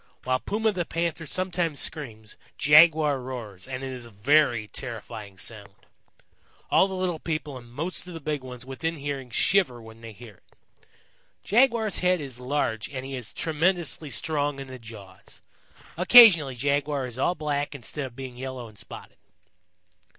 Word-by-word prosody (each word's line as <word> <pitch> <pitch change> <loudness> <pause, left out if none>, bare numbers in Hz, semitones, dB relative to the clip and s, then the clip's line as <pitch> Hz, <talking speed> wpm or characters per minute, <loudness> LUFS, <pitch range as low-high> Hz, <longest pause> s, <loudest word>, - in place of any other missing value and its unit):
While 130 0 +1
Puma 220 +6 0
the 185 -3 -2
panther 165 -1 -3
sometimes 175 -4 -1
screams, 110 -8 -4 0.2
Jaguar 150 -1 +6
roars, 120 -6 -7
and 130 0 -5
it 135 -1 -4
is 125 -2 -8
a 120 - -12
very 120 +1 +2
terrifying 110 -5 -7
sound. 100 -1 -6 1.0
All 190 - +5
the 190 - -5
little 180 -3 -2
people 155 -4 -4
and 120 -2 -11
most 165 +8 -2
of 180 - -8
the - - -6
big 150 -1 -3
ones 125 -1 -9
within 160 +5 -3
hearing 140 -3 -5
shiver 130 - +2
when 110 0 -13
they 115 -1 -9
hear 110 -2 -13
it. - - -31 0.9
Jaguar's 230 -2 +2
head 180 0 +2
is 135 -5 -7
large 125 -4 -2
and 130 -2 -6
he 135 0 -5
is 125 -4 -6
tremendously 165 -1 0
strong 145 +3 0
in 135 - -6
the 130 0 -9
jaws. 100 -5 -11 0.5
Occasionally 180 - +8
Jaguar 140 +1 0
is 125 0 -7
all 175 +6 +1
black 145 -2 -2
instead 135 +4 -4
of 120 - -15
being 130 -2 -8
yellow 130 -2 -6
and 105 -2 -13
spotted. - - -11
135 Hz, 165 wpm, -26 LUFS, 120-160 Hz, 1.0 s, Occasionally